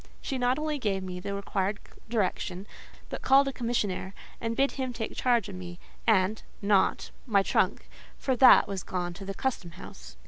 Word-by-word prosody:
She 265 - -3
not 250 +1 +2
only 305 -1 -2
gave 195 -5 -1
me 180 -1 -5
the 200 +2 -4
required 200 0 -1 0.3
direction, 190 -4 -1 0.4
but - - -5
called 275 +1 +5
a 275 - -2
commissionaire, 215 -6 -2 0.3
and 230 0 -2
bid 275 +2 +2
him 260 -2 -3
take 225 -2 -5
charge 240 -5 +2
of 200 - -8
me, 180 -1 -8 0.3
and—not 205 -1 +1 0.2
my 200 -4 +4
trunk, - - +1 0.3
for 260 - 0
that 260 - +8
was 195 -2 -3
gone 175 -1 -3
to 195 +3 -9
the 195 0 -5
custom 190 -10 -3
house. - - -12
205 Hz, 175 wpm, -28 LUFS, 185-250 Hz, 0.4 s, that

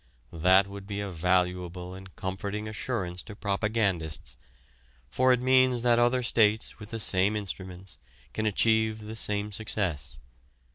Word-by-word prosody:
That 90 +4 +5
would 100 0 -9
be 100 -1 -4
a 100 -1 -4
valuable 90 +1 0
and 95 0 -11
comforting 100 +3 -4
assurance 105 -5 -3
to 105 - -10
propagandists, 100 -6 -1 0.8
for 130 0 +3
it 125 - +4
means 130 -1 +3
that 120 -1 +4
other 120 +1 +3
states 110 -2 +2
with 105 -1 -10
the 115 - -5
same 100 +1 +2
instruments 95 -2 -6 0.3
can 110 0 -1
achieve 110 +1 +2
the 110 +1 -7
same 105 -1 -1
success. 95 - -2
100 Hz, 140 wpm, -28 LUFS, 95-110 Hz, 0.8 s, That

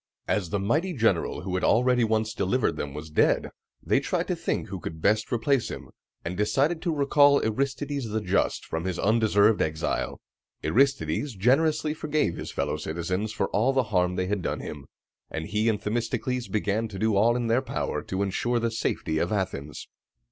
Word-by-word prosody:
As 95 -6 0
the 100 - 0
mighty 155 - 0
general 110 - +1
who 90 0 -4
had 90 - -1
already 125 +1 +3
once 110 0 0
delivered 115 +5 0
them 70 -1 -5
was 75 +1 -7
dead, - - +2 0.3
they - - +3
tried - - -1
to - - +1
think - - -2
who 95 -1 -5
could 80 -2 -7
best 105 +5 +1
replace 130 +1 +1
him, - - -8 0.4
and 85 +2 -3
decided 135 - +1
to 175 - 0
recall 145 0 +5
Aristides 135 +2 -2
the 110 +1 -1
Just 100 -1 0
from 80 +2 -4
his 90 -2 -2
undeserved 110 -1 +3
exile. 80 0 -1 0.4
Aristides 135 0 +1
generously 150 +8 +2
forgave 150 - 0
his - - -6
fellow - - -2
citizens 90 +6 -3
for 100 -3 -1
all 120 +6 +2
the 130 -1 +3
harm 90 0 +2
they 90 - 0
had 100 0 -1
done - - -2
him, 70 -3 -8 0.4
and 80 0 -4
he 105 +5 +1
and 105 -2 0
Themistocles 120 +3 -2
began 110 +1 -1
to 105 -3 -8
do 110 +1 +1
all 115 +4 +4
in 120 -1 -1
their 115 +3 +2
power 135 - -3
to 95 +1 -2
insure 120 +5 0
the 115 0 0
safety 80 -7 -1
of 85 - -1
Athens. 95 -8 -3
110 Hz, 185 wpm, -26 LUFS, 95-125 Hz, 0.4 s, recall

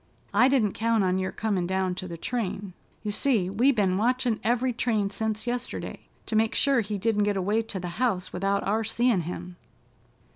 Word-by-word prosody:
I 230 +5 +6
didn't 250 -7 +2
count 225 -2 +1
on 185 0 +1
your 190 0 -2
comin' 200 -5 -1
down 190 0 0
to 185 +1 -6
the 170 -1 -6
train. 200 -2 -3 0.3
You 210 - -2
see, 205 -5 +2
we 240 +8 +4
ben 195 -7 +1
watchin' 245 0 +1
every 245 +2 +1
train 220 -4 0
sence 220 +1 -2
yesterday, 245 0 -4 0.2
to 220 - -3
make 220 0 +2
sure 275 -4 +3
he 210 -1 -3
didn't 210 +1 +1
get 205 -1 +1
away 205 +4 +1
to 220 -4 -5
the 180 - -5
house 190 -8 0
without 195 +2 0
our 215 +3 +1
seein' 230 -2 +2
him. 175 +1 -6
210 Hz, 190 wpm, -27 LUFS, 190-235 Hz, 0.3 s, I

